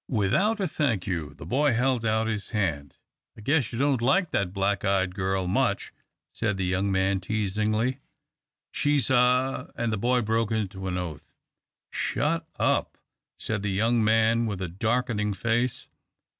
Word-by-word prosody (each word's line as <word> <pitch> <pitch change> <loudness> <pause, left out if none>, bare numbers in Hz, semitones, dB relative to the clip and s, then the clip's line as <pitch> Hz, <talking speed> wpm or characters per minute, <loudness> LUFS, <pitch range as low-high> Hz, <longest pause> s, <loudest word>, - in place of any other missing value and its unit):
Without 160 - +1
a 195 - 0
"thank 135 - 0
you," 80 -6 -3
the - - -10
boy 140 +2 +2
held 125 0 +1
out 110 0 +1
his 110 -3 -3
hand. 85 - -2 0.4
"I - - -10
guess 140 +2 +1
you 115 - -5
don't 135 -2 +2
like 170 +9 +2
that 100 -3 0
black 100 0 0
eyed 95 -2 +1
girl 95 -1 -1
much," 90 - 0 0.4
said 105 -4 -1
the 95 - -1
young 95 +2 0
man, 95 0 +1
teasingly. 110 +5 -1 0.7
"She's 145 -2 +1
a 125 +1 +2
" - - -43
and 115 -1 -1
the 110 - -1
boy 125 +3 +2
broke 115 +1 0
into 95 -3 -2
an 90 -1 -2
oath. 85 -5 -6 0.6
"Shut - - -1
up!" - - +1 0.4
said 110 -2 -3
the 105 - -2
young 115 +4 +2
man, 115 +1 +3
with 100 -3 -3
a - - -2
darkening 105 +2 -1
face. 120 +4 -1
110 Hz, 165 wpm, -26 LUFS, 95-125 Hz, 0.7 s, man